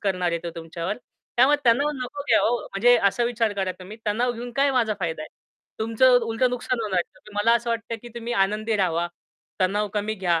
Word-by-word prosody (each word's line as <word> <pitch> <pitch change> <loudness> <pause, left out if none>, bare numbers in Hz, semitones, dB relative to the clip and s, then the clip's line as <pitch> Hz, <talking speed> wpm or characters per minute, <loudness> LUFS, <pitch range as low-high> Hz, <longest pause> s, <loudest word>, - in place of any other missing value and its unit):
करणार 185 -3 0
आहे 170 - -1
ते 170 - -3
तुमच्यावर. 165 +4 -4 0.4
त्यामुळे 265 +5 +6
तणाव 280 +6 +4
नको 260 +2 -5
घ्या - - +5
हो 240 +2 +2
म्हणजे 240 +5 +3
असा 240 +4 -1
विचार 230 -3 0
करा 190 -2 -1
तुम्ही 190 +4 -10
तणाव 240 +4 +1
घेऊन 240 +1 -7
काय 280 0 +4
माझा 230 -5 +2
फायदा 160 -3 -2
आहे? - - -8 0.5
तुमचं 230 +3 +4
उलटं 230 +3 +1
नुकसान 250 0 -2
होणार 200 -5 0
आहे. 175 - -4
तर - - -13
मला 220 +3 +4
असं 235 0 -4
वाटतं, 230 0 -2
की 240 - -9
तुम्ही 235 0 -4
आनंदी 215 +2 -1
राहावा. 175 -3 +1 0.5
तणाव 205 +3 +1
कमी 210 +1 -1
घ्या. 175 -4 +1
220 Hz, 210 wpm, -24 LUFS, 190-240 Hz, 0.5 s, त्यामुळे